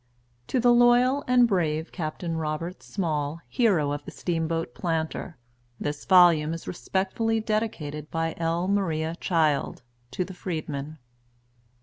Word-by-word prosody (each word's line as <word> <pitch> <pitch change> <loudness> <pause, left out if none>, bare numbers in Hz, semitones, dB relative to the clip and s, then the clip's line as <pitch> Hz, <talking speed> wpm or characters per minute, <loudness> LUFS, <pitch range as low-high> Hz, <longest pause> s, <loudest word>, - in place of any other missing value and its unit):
TO 255 - 0
THE 240 0 +5
LOYAL 245 +3 +4
AND 250 -1 +5
BRAVE 160 -6 0
CAPTAIN 165 0 -4
ROBERT 160 +3 -3
SMALL, 155 -4 -2
Hero 185 - +2
of 145 0 -4
the - - -8
Steamboat 165 -5 -2
Planter, 160 0 -3 0.4
THIS 145 0 -4
VOLUME 170 -4 +5
IS 165 - -10
RESPECTFULLY 195 +5 -1
DEDICATED 170 -10 -3
BY 165 0 -1
L. 170 +2 0
MARIA 165 -5 0
CHILD. 155 -7 0 0.3
TO 180 - -2
THE 190 - -9
FREEDMEN. 155 -4 -5
165 Hz, 125 wpm, -26 LUFS, 155-195 Hz, 0.4 s, THE